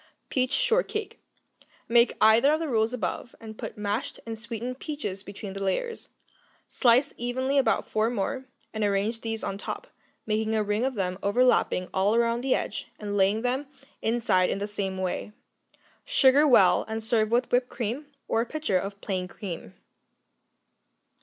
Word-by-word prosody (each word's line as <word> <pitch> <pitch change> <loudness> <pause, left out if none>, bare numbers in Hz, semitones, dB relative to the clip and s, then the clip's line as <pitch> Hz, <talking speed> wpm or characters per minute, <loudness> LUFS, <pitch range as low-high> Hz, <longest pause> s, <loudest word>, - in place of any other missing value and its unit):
Peach 255 0 0
Shortcake 470 -3 0 0.7
Make 235 0 +4
either 225 +6 +6
of 310 - +1
the 325 - -2
rules 225 -3 +1
above, 245 0 -4
and 220 -1 -9
put - - -7
mashed 210 +3 -3
and 225 -1 -4
sweetened 235 +3 -5
peaches 280 -11 -4
between 200 0 -8
the 195 - -6
layers. 450 - -2 0.6
Slice 250 +2 +4
evenly 260 +3 0
about 265 - +1
four 215 +1 +1
more, 245 +4 -2 0.3
and 220 -1 -2
arrange 205 +3 0
these 225 -1 -3
on 195 0 -3
top, - - -5 0.4
making 220 0 0
a 215 - +2
ring 210 +4 0
of 265 -1 -1
them 185 -2 -2
overlapping 205 -4 +2
all 195 +3 +2
around 235 0 +2
the 260 0 +2
edge, - - -4
and 205 -1 -4
laying 205 +3 +2
them 260 +3 -1 0.3
inside 225 -5 +2
in - - -1
the 200 +1 -3
same 195 -2 -3
way. 185 +3 -3 0.7
Sugar 295 - +5
well, 190 -9 +6
and 220 0 -4
serve 220 -1 +2
with 240 +2 +1
whipped 250 0 +2
cream 245 +5 -4 0.2
or 225 - +2
a - - -1
pitcher 305 -12 0
of 200 +1 -6
plain 185 -2 -2
cream. 175 - -7
225 Hz, 165 wpm, -27 LUFS, 205-250 Hz, 0.7 s, either